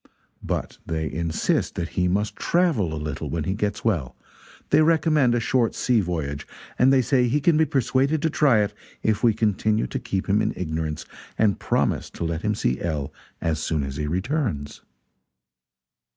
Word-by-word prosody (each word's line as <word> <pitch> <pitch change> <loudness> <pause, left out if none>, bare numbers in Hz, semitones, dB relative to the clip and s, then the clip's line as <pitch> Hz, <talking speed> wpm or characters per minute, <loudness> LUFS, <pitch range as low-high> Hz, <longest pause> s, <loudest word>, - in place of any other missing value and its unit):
But - - -4
they 80 -1 -3
insist 80 -1 -1
that 85 -1 -3
he 90 0 0
must 100 +4 0
travel 160 - +1
a - - -3
little 75 -2 -4
when 80 -2 -2
he 95 - -1
gets 105 +1 -2
well 80 - 0 0.6
they - - +6
recommend 155 -5 +3
a - - +2
short 120 -1 +1
sea 120 -3 +2
voyage, 75 -6 -3 0.3
and 130 +2 +6
they 130 -2 +4
say 125 0 +2
he 140 +5 +2
can 160 +3 +3
be 160 +1 +4
persuaded 135 +2 +1
to 160 - +2
try 135 -8 +4
it 100 - -3 0.3
if 110 -2 +1
we 115 -3 +4
continue 110 0 +1
to - - -4
keep 95 -1 -3
him 105 +2 +3
in - - 0
ignorance 80 -3 -3 0.3
and 105 -2 +2
promise - - 0
to - - -3
let 80 -1 -2
him 105 0 0
see 65 -10 -1
L. 75 -5 -3 0.3
as 80 -2 0
soon 80 -2 -1
as 70 0 -5
he 75 - -2
returns." 95 - -2
105 Hz, 180 wpm, -24 LUFS, 80-125 Hz, 0.6 s, they